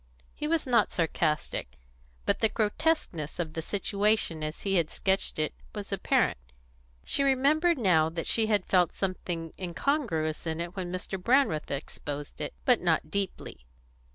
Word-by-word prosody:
He 300 - -3
was 325 0 +1
not 245 -3 +3
sarcastic, 155 - -1 0.5
but - - +2
the 220 - +3
grotesqueness 215 - 0
of 160 -3 -3
the 160 - -3
situation 200 -2 0
as 155 +1 -4
he 195 - 0
had 165 -2 +1
sketched 195 0 0
it 155 - -1 0.2
was - - -4
apparent. - - +2 0.7
She - - +1
remembered 285 +5 +3
now 170 -9 +4
that 165 0 -4
she 225 -1 +2
had 210 -4 +2
felt 180 -3 +3
something 175 -4 -3
incongruous 175 - -1
in 160 0 -2
it 170 +2 -4
when 180 -2 -4
Mr. 185 +1 -4
Brandreth 240 - +2
exposed 145 +1 -5
it, - - -4
but 250 -3 +5
not 160 -3 +1
deeply. 195 - -4
185 Hz, 155 wpm, -29 LUFS, 160-225 Hz, 0.7 s, but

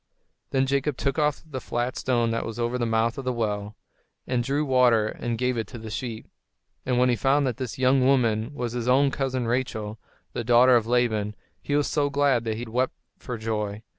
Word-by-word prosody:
Then 135 0 +2
Jacob 140 0 0
took 140 +2 -1
off 150 -1 +1
the 135 -5 -6
flat 120 +1 -2
stone 120 -3 +1
that 115 - -1
was 115 -1 -6
over 120 +1 -1
the 120 - 0
mouth 115 +2 +1
of - - -5
the 130 - 0
well, 105 -3 -2 0.5
and 125 -2 0
drew 140 +4 0
water 125 -5 +4
and 120 -1 -3
gave 125 +1 0
it 110 - -3
to - - -9
the 110 -1 -8
sheep. 115 -1 -5 0.6
And 125 -1 +1
when 125 +1 +4
he 120 - +3
found 140 +4 +2
that 125 -2 -2
this 130 -4 -5
young 130 0 +3
woman 120 -3 +2
was 120 -4 -3
his 120 0 -3
own 135 +2 +4
cousin 130 -2 -1
Rachel, 110 -3 -2 0.3
the 120 - -3
daughter 120 +2 +6
of 115 -2 +2
Laban, 110 -4 +1 0.3
he 145 - -1
was 145 -1 +2
so 145 -2 0
glad 140 -4 +2
that 110 -1 -2
he 120 - -5
wept 125 +3 -1 0.2
for 125 - -5
joy. 110 -1 -3
125 Hz, 215 wpm, -25 LUFS, 115-130 Hz, 0.6 s, daughter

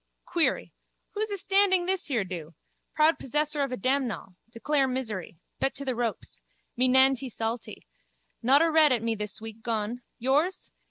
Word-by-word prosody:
Query. 340 -3 0 0.4
Who's 435 +1 -2
astanding 390 -2 +2
this 375 0 -1
here 245 -8 0
do? 170 -4 -7 0.4
Proud 310 +2 +4
possessor 295 +2 -1
of 275 - 0
damnall. 255 -5 -1 0.2
Declare 270 +4 0
misery. 220 -10 -4 0.2
Bet 270 - 0
to 280 - -5
the 260 - 0
ropes. 235 -2 -4 0.3
Me 255 +2 +3
nantee 265 0 +4
saltee. 225 0 -4 0.6
Not 275 +6 +5
a 330 - +2
red 310 -2 +6
at 240 -3 +1
me 230 0 0
this 210 -1 -5
week 225 0 -9
gone. 225 +1 -2 0.2
Yours? 290 +9 0
260 Hz, 155 wpm, -27 LUFS, 225-305 Hz, 0.6 s, red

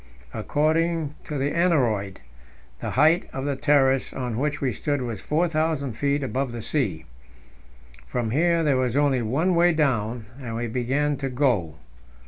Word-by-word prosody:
According 160 0 0
to 150 - -4
the 140 +2 0
aneroid, 120 - +1 0.6
the - - -4
height 155 +6 +3
of 135 0 -4
the 140 -1 -1
terrace 135 -2 +2
on 125 -3 -3
which 150 +1 -1
we 135 -2 0
stood 145 +4 -2
was 115 -3 -5
4,000 155 -4 0
feet 140 +4 0
above 130 0 -2
the 115 -2 -6
sea. 100 - -1 1.0
From 120 -3 -2
here 170 +4 +2
there 145 -4 +2
was 130 0 0
only 140 -3 +2
one 140 +12 +1
way 175 0 +4
down, 120 -7 0 0.2
and 115 -3 -5
we 120 +1 -2
began 135 +5 0
to 135 0 -3
go. 120 - 0
135 Hz, 155 wpm, -24 LUFS, 120-150 Hz, 1.0 s, way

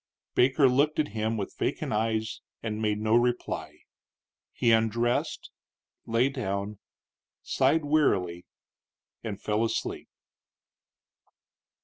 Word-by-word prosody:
Baker 135 +2 +4
looked 140 +4 +2
at 155 - +1
him 110 +1 -1
with 100 - -4
vacant - - -1
eyes 110 0 -1 0.2
and 110 -1 -3
made 105 -1 +1
no 110 +1 0
reply. 120 0 -1 0.7
He 115 - +2
undressed, 115 +2 +1 0.6
lay 115 +3 +3
down, 100 -6 -3 0.6
sighed 145 +4 +2
wearily, 95 - +1 0.8
and 105 -4 -4
fell 105 +2 0
asleep. 115 - -3
115 Hz, 100 wpm, -28 LUFS, 105-125 Hz, 0.8 s, Baker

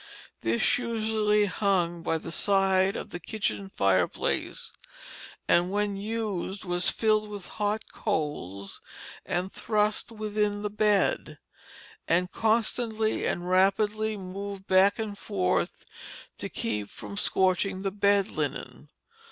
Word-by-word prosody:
This 115 - +2
usually 220 -3 +1
hung 180 -4 0
by 165 -1 0
the 165 - -7
side 195 0 +3
of - - -6
the 175 - -5
kitchen 200 +1 -3
fireplace, 95 - 0 0.8
and 175 +2 +3
when 205 0 0
used 205 -2 -3
was 175 0 +1
filled 215 -1 +1
with 205 -3 -7
hot 210 +1 0
coals, 145 - -3 0.5
and 180 +2 -2
thrust 210 +1 0
within 210 -1 -1
the 210 - -2
bed, 210 -2 +1 0.7
and 180 +2 +2
constantly 220 0 +1
and 175 0 -2
rapidly 205 +4 +2
moved 195 +1 -6
back 190 +2 +5
and 215 -2 -3
forth 145 - -1 0.5
to - - -4
keep 105 -2 -3
from 105 -1 -9
scorching 190 - +1
the 195 - 0
bed 200 0 +2
linen. - - -4
200 Hz, 120 wpm, -28 LUFS, 180-210 Hz, 0.8 s, back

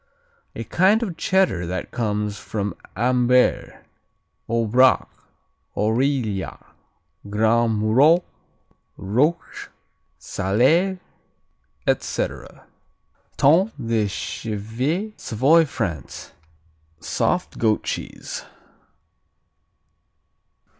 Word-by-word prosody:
A - - -4
kind 200 +6 +3
of 185 -7 -4
Cheddar 180 - +1
that 90 +1 -4
comes 105 -3 -2
from 100 -3 -4 0.2
Ambert, 125 +2 +1 0.6
Aubrac, 115 +3 +3 0.7
Aurillac, 110 -2 0 0.7
Grand 110 +1 +2
Murol, 140 +11 +4 0.7
Rôche, 135 - -1 0.5
Salers, 155 - +1 0.9
etc. - - -3 0.7
Tome 175 +10 +4
de 115 -2 0
Chèvre 115 - -3
Savoy, 135 +8 +3
France 90 - -5 0.7
Soft - - -1
goat 110 -2 +2
cheese. - - -5
120 Hz, 65 wpm, -22 LUFS, 105-155 Hz, 0.9 s, Murol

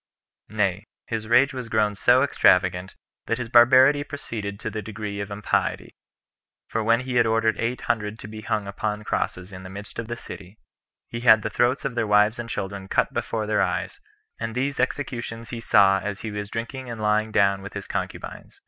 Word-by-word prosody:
Nay, 105 -1 0 0.2
his 110 -1 -4
rage 125 +5 +4
was 125 -3 -6
grown 105 -1 +2
so 120 +6 +4
extravagant, 90 -8 +2 0.3
that 115 - 0
his 125 -2 -5
barbarity 130 +4 +6
proceeded 110 -8 -6
to 110 - -4
the 110 0 -4
degree 105 -1 -6
of 100 0 -4
impiety; 105 0 -1 0.7
for 110 - -2
when 115 +2 +3
he 125 -1 -2
had 120 -1 +4
ordered 110 0 +2
eight 120 +2 -2
hundred 110 -2 -2
to 105 - -9
be 110 0 -8
hung 110 -2 -2
upon 105 +1 -3
crosses 90 -2 -3
in 95 - -8
the 95 - -9
midst 100 +3 -9
of 115 - -4
the 120 - -4
city, 100 -2 -10 0.5
he 115 - -5
had 110 -3 +6
the - - -3
throats 125 +3 +1
of 135 - -1
their 120 -2 -1
wives 105 +2 +3
and 120 -1 -5
children 95 -2 -5
cut - - +1
before 110 -1 -2
their 105 0 +1
eyes; - - -2 0.4
and 115 0 -4
these 135 +2 -1
executions 120 -3 -3
he 120 - -4
saw 100 -3 +4
as 100 0 -5
he 110 - -5
was 105 0 -5
drinking 120 +3 -5
and 115 -2 -6
lying 110 +1 +1
down 100 -2 +3
with 100 - -9
his - - -6
concubines. - - -6
110 Hz, 200 wpm, -24 LUFS, 105-120 Hz, 0.7 s, barbarity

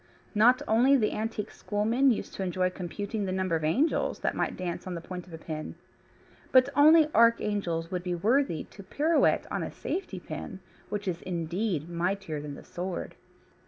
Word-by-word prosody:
No 220 +3 +7 0.2
wonder 250 +5 +5
the 215 -4 +1
antique 215 -1 -3
schoolmen 225 +6 +1
used 230 - -1
to - - -6
enjoy 185 0 0
computing 200 +4 -4
the 185 - -2
number 185 -2 0
of 160 - -2
angels 250 - +1
that - - 0
might - - -2
dance 180 0 -4
on 180 - -4
the - - -4
point 180 +1 -8
of 175 - -13
a - - -5
pin. 155 -1 -6 0.8
But 255 +1 +6
only 305 +1 +6
archangels 205 -8 +2
would 180 -1 -2
be 180 0 -2
worthy 220 - +1
to 200 - -13
pirouette 300 - +2
on - - -1
a - - -3
safety 385 - -4
pin, 190 - -7 0.3
which 205 -1 -4
is 175 -2 -2
indeed 175 -1 -2
mightier 175 -2 -2
than 145 -1 -6
the - - -11
sword. 180 0 -5
190 Hz, 180 wpm, -28 LUFS, 175-225 Hz, 0.8 s, No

